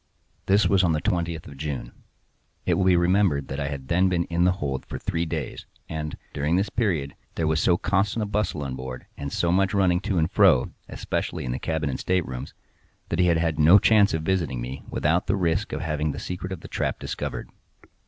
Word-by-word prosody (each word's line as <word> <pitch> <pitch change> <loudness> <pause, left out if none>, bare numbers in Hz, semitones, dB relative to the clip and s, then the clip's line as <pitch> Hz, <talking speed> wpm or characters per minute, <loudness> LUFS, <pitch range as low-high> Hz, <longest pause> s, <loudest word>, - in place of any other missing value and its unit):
This 100 +2 +4
was 95 -1 +3
on 85 -2 +3
the 75 - +1
twentieth 85 -1 -1
of 70 - -11
June. 70 -4 -4 0.7
It - - +2
will 95 - +1
be 95 -1 +5
remembered 85 -5 +2
that 70 - -4
I 70 - -1
had 70 -2 -5
then 90 +4 +3
been 85 -2 +1
in 85 +1 +2
the 90 - +4
hold 70 -8 -3
for - - -5
three 85 0 -2
days; 80 -5 -5 0.2
and, 75 -1 -4 0.2
during 75 +4 0
this 95 +3 0
period, 85 - 0 0.2
there 80 - 0
was 80 0 +2
so 85 - +4
constant 100 +4 0
a - - -1
bustle 100 -7 -1
on 65 -2 -4
board, 65 -1 -7
and 70 0 -5
so 85 - +1
much 95 +2 +2
running 90 -3 +3
to 95 0 -2
and 80 -1 +1
fro, - - +4 0.2
especially - - -3
in 60 - -2
the 65 - -3
cabin 80 -1 -1
and 65 - -3
staterooms, 85 -9 -2 0.5
that - - -1
he 90 - +4
had 85 -1 +4
had 80 -2 0
no 80 +6 +8
chance 105 -1 +5
of 80 - -3
visiting 85 -8 0
me 65 +3 -5
without 85 +4 +1
the 100 - +2
risk 90 +2 0
of - - -3
having 75 -2 -1
the - - -6
secret 90 +1 -5
of 95 - -5
the - - -9
trap - - -2
discovered. - - -5
85 Hz, 220 wpm, -25 LUFS, 75-95 Hz, 0.7 s, no